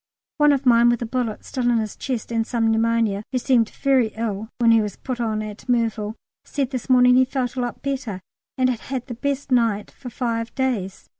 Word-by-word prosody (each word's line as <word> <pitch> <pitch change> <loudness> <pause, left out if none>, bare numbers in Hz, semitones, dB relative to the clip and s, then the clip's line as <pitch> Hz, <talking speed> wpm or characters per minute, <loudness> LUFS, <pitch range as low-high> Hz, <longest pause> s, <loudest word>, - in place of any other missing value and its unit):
One 295 -1 +5
of 275 -1 0
mine 235 -1 +6
with 240 0 +1
a - - -2
bullet 230 -2 -3
still 250 -2 -1
in 240 - +3
his 215 -2 -2
chest, 245 -4 -4
and 225 0 0
some 225 -2 +1
pneumonia, 225 -2 +1
who 260 - 0
seemed 245 -3 +2
very 265 -4 +2
ill 220 -1 -3
when 230 -1 +4
he 225 -1 +5
was 210 -1 -4
put 250 -2 -5
on 215 -2 -1
at 215 +3 -9
Merville, 225 -3 0 0.3
said 275 -3 -2
this 255 -1 -5
morning 250 -1 +6
he 260 - +6
felt 260 -1 -2
a 255 - -1
lot 245 -1 -4
better 265 -8 -3 0.4
and 255 -1 +3
had 250 -3 -1
had 255 0 -5
the 250 - -6
best 280 +3 -3
night 230 -4 +1
for 255 - -9
five 230 -2 -3
days! 220 -8 -2
240 Hz, 220 wpm, -22 LUFS, 225-255 Hz, 0.4 s, mine